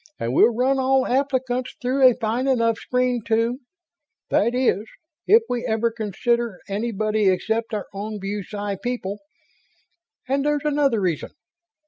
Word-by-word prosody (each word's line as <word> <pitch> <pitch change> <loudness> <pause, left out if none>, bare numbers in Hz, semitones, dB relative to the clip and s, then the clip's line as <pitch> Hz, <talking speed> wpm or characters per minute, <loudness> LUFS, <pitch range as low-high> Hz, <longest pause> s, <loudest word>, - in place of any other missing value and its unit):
"And 115 +2 -2
we'll 225 - +5
run 265 +3 +2
all 265 0 +3
applicants 260 -1 -1
through 260 +2 0
a 245 - 0
fine 240 +3 -1
enough 230 -4 +2
screen 250 -1 0
to 230 +2 +1 0.7
that 235 +4 +2
is, 230 -5 +1 0.4
if 445 +3 +6
we 245 -1 -2
ever 225 +1 +1
consider 230 0 -1
anybody 215 0 0
except 220 +5 -1
our 210 - -3
own 210 +2 -5
BuSci 200 0 -4
people. 225 -5 -3 1.1
And 275 +1 +1
there's 295 0 0
another 285 -6 +2
reason." 175 -6 -1
235 Hz, 135 wpm, -23 LUFS, 210-255 Hz, 1.1 s, if